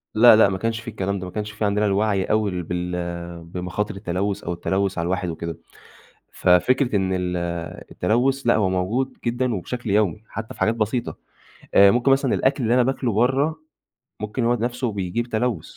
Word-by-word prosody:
لأ، 115 Hz, 0 st, +8 dB
لأ، 110 Hz, -2 st, +6 dB
ما 95 Hz, -, -2 dB
كانش 115 Hz, +2 st, -2 dB
فيه 115 Hz, 0 st, -7 dB
الكلام 100 Hz, 0 st, -2 dB
ده، 95 Hz, -, -6 dB
ما 90 Hz, -, -7 dB
كانش 105 Hz, -1 st, -4 dB
فيه 105 Hz, +1 st, -2 dB
عندنا 105 Hz, +1 st, +1 dB
الوعي 100 Hz, -1 st, +1 dB
أوي 100 Hz, -5 st, 0 dB
بال 85 Hz, -1 st, -4 dB
بمخاطر 90 Hz, +4 st, -4 dB
التلوّث 95 Hz, +2 st, -2 dB
أو 85 Hz, -, -2 dB
التلوّث 95 Hz, +2 st, -1 dB
على 85 Hz, -, -1 dB
الواحد 90 Hz, 0 st, -1 dB
وكده، 85 Hz, 0 st, -5 dB, 0.8 s
ففكرة 120 Hz, +7 st, +3 dB
إن 95 Hz, -1 st, 0 dB
ال 90 Hz, -1 st, -1 dB, 0.5 s
التلوّث، 125 Hz, +7 st, 0 dB
لأ 120 Hz, -, +5 dB
هو 100 Hz, -3 st, +2 dB
موجود 110 Hz, +9 st, -1 dB
جدًا 120 Hz, 0 st, 0 dB
وبشكل 115 Hz, +4 st, -4 dB
يومي 105 Hz, +1 st, +1 dB
حتى 110 Hz, +2 st, -7 dB
في -, -, -17 dB
حاجات 110 Hz, -, +2 dB
بسيطة 115 Hz, +2 st, -2 dB, 0.6 s
آآ، 100 Hz, 0 st, +7 dB
ممكن 125 Hz, +4 st, +2 dB
مثلًا 135 Hz, -2 st, +2 dB
الأكْل 135 Hz, -1 st, +1 dB
اللي 115 Hz, +2 st, +2 dB
أنا 125 Hz, -1 st, +4 dB
باكْله 130 Hz, -3 st, -1 dB
برّه، 135 Hz, +8 st, +1 dB, 0.6 s
ممكن 110 Hz, +3 st, -2 dB
هو 120 Hz, +1 st, +3 dB
نَفسه 120 Hz, 0 st, -2 dB
بيجيب 100 Hz, +4 st, -2 dB
تلوّث 110 Hz, -7 st, -2 dB
105 Hz, 185 wpm, -23 LUFS, 90-120 Hz, 0.8 s, لأ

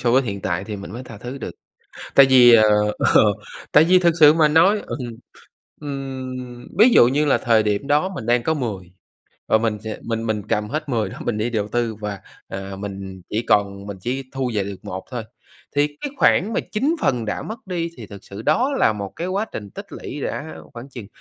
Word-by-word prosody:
so 120 Hz, -2 st, +1 dB
với 130 Hz, +2 st, +4 dB
hiện 100 Hz, -5 st, -4 dB
tại 90 Hz, +2 st, -2 dB
thì 105 Hz, -1 st, -5 dB
mình 100 Hz, 0 st, -9 dB
mới 120 Hz, -, -6 dB
tha 115 Hz, -3 st, -10 dB
thứ 125 Hz, +4 st, -7 dB
được. -, -, -5 dB, 0.6 s
Tại 140 Hz, -, +8 dB
vì, 125 Hz, -2 st, +8 dB
ờ, 110 Hz, -, +7 dB, 0.4 s
ờ, -, -, +5 dB, 0.5 s
tại 150 Hz, +2 st, +7 dB
vì 185 Hz, +2 st, +5 dB
thực 170 Hz, -2 st, +3 dB
sự 150 Hz, 0 st, +9 dB
mà 155 Hz, -2 st, +4 dB
nói 190 Hz, +7 st, +4 dB
ừm, -, -, -5 dB, 0.8 s
ừm, 130 Hz, -3 st, -6 dB
ví 225 Hz, -, +8 dB
dụ 120 Hz, -, +7 dB
như 145 Hz, +3 st, +1 dB
là 145 Hz, -, +3 dB
thời 115 Hz, -3 st, +3 dB
điểm 105 Hz, +4 st, -1 dB
đó 150 Hz, +6 st, +2 dB
mình 180 Hz, -, -7 dB
đang 120 Hz, 0 st, +3 dB
có 160 Hz, +5 st, +1 dB
10, 100 Hz, -, -5 dB, 0.6 s
và 110 Hz, -, +4 dB
mình 110 Hz, -2 st, -1 dB
sẽ 110 Hz, -, -5 dB
mình 115 Hz, -1 st, -2 dB
mình 110 Hz, -2 st, -1 dB
cầm 105 Hz, 0 st, 0 dB
hết 155 Hz, 0 st, -3 dB
10 110 Hz, -5 st, 0 dB
đó -, -, -9 dB
mình 115 Hz, -3 st, -1 dB
đi 110 Hz, +3 st, -1 dB
đầu 105 Hz, -3 st, -1 dB
tư 120 Hz, -1 st, -1 dB
và, 105 Hz, -2 st, -5 dB, 0.3 s
à, 95 Hz, 0 st, -6 dB
mình 95 Hz, -2 st, -7 dB
chỉ 110 Hz, +2 st, -1 dB
còn 100 Hz, -1 st, +1 dB
mình 100 Hz, -1 st, -6 dB
chỉ 130 Hz, +7 st, -3 dB
thu 130 Hz, -2 st, -2 dB
về 100 Hz, -, 0 dB
được 100 Hz, 0 st, -6 dB
1 95 Hz, +1 st, -6 dB
thôi, 120 Hz, -3 st, -4 dB, 0.5 s
thì 145 Hz, +1 st, +3 dB
cái 285 Hz, -, -3 dB
khoản 210 Hz, -4 st, +3 dB
mà -, -, +1 dB
9 275 Hz, +10 st, +1 dB
phần 120 Hz, -4 st, +1 dB
đã 105 Hz, -, -3 dB
mất 220 Hz, +2 st, -6 dB
đi 170 Hz, -2 st, -2 dB
thì 115 Hz, -4 st, -9 dB
thực 100 Hz, -1 st, -12 dB
sự 100 Hz, +3 st, -9 dB
đó 260 Hz, -, +2 dB
là 110 Hz, -, +4 dB
một 100 Hz, -2 st, -6 dB
cái 170 Hz, -, -3 dB
quá 200 Hz, +4 st, -1 dB
trình 105 Hz, -2 st, -7 dB
tích -, -, -9 dB
lũy -, -, -7 dB
đã 80 Hz, -, -4 dB, 0.2 s
khoảng 120 Hz, +3 st, -9 dB
chừng 120 Hz, -7 st, -9 dB
120 Hz, 230 wpm, -21 LUFS, 105-145 Hz, 0.8 s, sự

